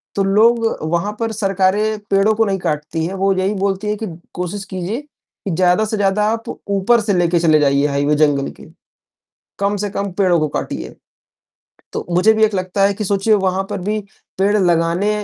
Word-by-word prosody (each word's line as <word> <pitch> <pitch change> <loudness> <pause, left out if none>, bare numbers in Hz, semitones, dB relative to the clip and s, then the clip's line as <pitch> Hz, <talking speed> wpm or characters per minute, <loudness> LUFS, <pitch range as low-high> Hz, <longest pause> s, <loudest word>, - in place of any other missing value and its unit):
तो 200 - +1
लोग 225 +4 +3 0.2
वहाँ 170 +5 -1
पर 225 -1 -1
सरकारें 205 +1 +1
पेड़ों 195 +2 +4
को 225 0 +2
नहीं 195 -2 -1
काटती 155 +1 -2
है, 180 - -4
वह 195 0 +1
यही 195 +3 0
बोलती 195 +1 -1
है 210 - 0
कि 220 - -4 0.3
कोशिश 180 +3 -4
कीजिए 190 +7 -4
कि 285 -9 -11
ज़्यादा 180 +5 +2
से 215 0 -3
ज़्यादा 205 +1 +1
आप 230 0 -4 0.2
ऊपर 200 +4 +3
से 205 -1 0
लेकर 175 -1 +2
चले 155 -2 +4
जाइए 140 0 +2
हाईवे 145 +1 +1
जंगल 145 -2 +2
के, - - -15 1.0
कम 200 +1 0
से 205 +1 -2
कम 200 0 -3
पेड़ों 180 -3 +2
को 155 - +1
काटिए। - - -5 1.0
तो - - -4
मुझे 185 +6 +4
भी 220 - +4
एक 215 -2 0
लगता 185 +1 -1
है 200 - +2
कि 210 +1 -4
सोचिए 200 +2 +2
वहाँ 190 -1 +1
पर - - -3
भी 215 +2 -1 0.4
पेड़ 200 +2 +2
लगाने 175 +2 +1
195 Hz, 195 wpm, -18 LUFS, 175-210 Hz, 1.0 s, पेड़ों